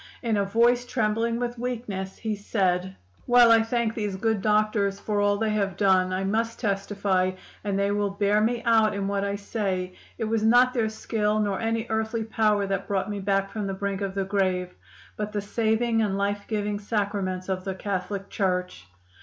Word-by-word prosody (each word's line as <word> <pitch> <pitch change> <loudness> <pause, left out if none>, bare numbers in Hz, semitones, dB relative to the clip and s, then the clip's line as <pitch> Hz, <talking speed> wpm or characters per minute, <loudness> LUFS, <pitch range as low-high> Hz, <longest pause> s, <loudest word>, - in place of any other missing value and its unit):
In 230 -2 +1
a 200 - +2
voice 235 +4 +3
trembling 230 -1 0
with 240 0 -3
weakness 220 -6 -4
he 220 -1 -2
said: 190 -3 0 0.3
"'While 245 -1 +7
I 225 0 +7
thank 225 0 0
these 210 -4 -3
good 220 +1 0
doctors 210 -1 +1
for 205 -1 -1
all 205 0 +2
they 220 0 0
have 200 -3 -1
done, 190 -2 +3
I 185 +1 -1
must 225 +4 -1
testify 195 -3 0 0.3
and 200 -2 -1
they 200 0 +1
will 205 0 0
bear 205 +1 +1
me 235 +2 0
out 220 -2 +4
in 200 -1 -2
what 200 0 -1
I 200 0 -1
say 195 -3 -3 0.2
it 230 - -3
was 220 0 0
not 245 +3 +5
their 225 -3 +1
skill 215 -1 -1
nor 205 -2 0
any 225 0 -1
earthly 220 +1 -1
power 215 -2 +1
that 195 0 -2
brought 200 +1 -1
me 205 - -3
back 195 0 0
from 210 -3 -3
the 195 - -3
brink 200 0 -3
of 195 -1 -3
the 195 -1 0
grave, 185 -2 0 0.4
but 210 0 -3
the 205 - -1
saving 225 +2 +1
and 200 -3 0
life 200 0 -1
giving 210 -1 -2
Sacraments 200 -3 -2
of 185 -1 -2
the 190 -1 -3
Catholic 195 0 -3
Church. 180 - -2
205 Hz, 195 wpm, -26 LUFS, 195-225 Hz, 0.4 s, While